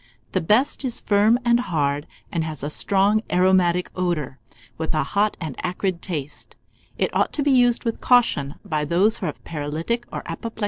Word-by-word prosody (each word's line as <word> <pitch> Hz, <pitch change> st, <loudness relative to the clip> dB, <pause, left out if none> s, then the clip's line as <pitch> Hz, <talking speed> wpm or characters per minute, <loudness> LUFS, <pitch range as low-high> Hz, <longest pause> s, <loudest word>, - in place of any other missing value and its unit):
The 185 Hz, -, 0 dB
best 225 Hz, -, +2 dB
is 250 Hz, -3 st, -2 dB
firm 210 Hz, +3 st, +3 dB
and 240 Hz, 0 st, +4 dB
hard, 145 Hz, -8 st, -1 dB, 0.2 s
and 165 Hz, -, -1 dB
has 155 Hz, -3 st, -5 dB
a 145 Hz, -, -3 dB
strong 200 Hz, +5 st, +2 dB
aromatic 180 Hz, -1 st, +3 dB
odour, 160 Hz, -7 st, -2 dB, 0.4 s
with 160 Hz, 0 st, -3 dB
a 155 Hz, -, +2 dB
hot 205 Hz, +8 st, 0 dB
and 155 Hz, -5 st, -5 dB
acrid 180 Hz, -1 st, -2 dB
taste. 150 Hz, -6 st, -6 dB, 0.4 s
It -, -, -1 dB
ought -, -, +2 dB
to 290 Hz, -, 0 dB
be 285 Hz, -, +2 dB
used 245 Hz, -2 st, +4 dB
with 230 Hz, -2 st, -3 dB
caution 230 Hz, -, +3 dB
by 155 Hz, -6 st, -1 dB
those 180 Hz, +9 st, +2 dB
who 185 Hz, -, -2 dB
are -, -, 0 dB
of -, -, -9 dB
paralytic 165 Hz, +10 st, -3 dB
or -, -, -4 dB
apoplectic -, -, -7 dB
habits. 230 Hz, -1 st, -6 dB
180 Hz, 190 wpm, -23 LUFS, 155-220 Hz, 0.4 s, and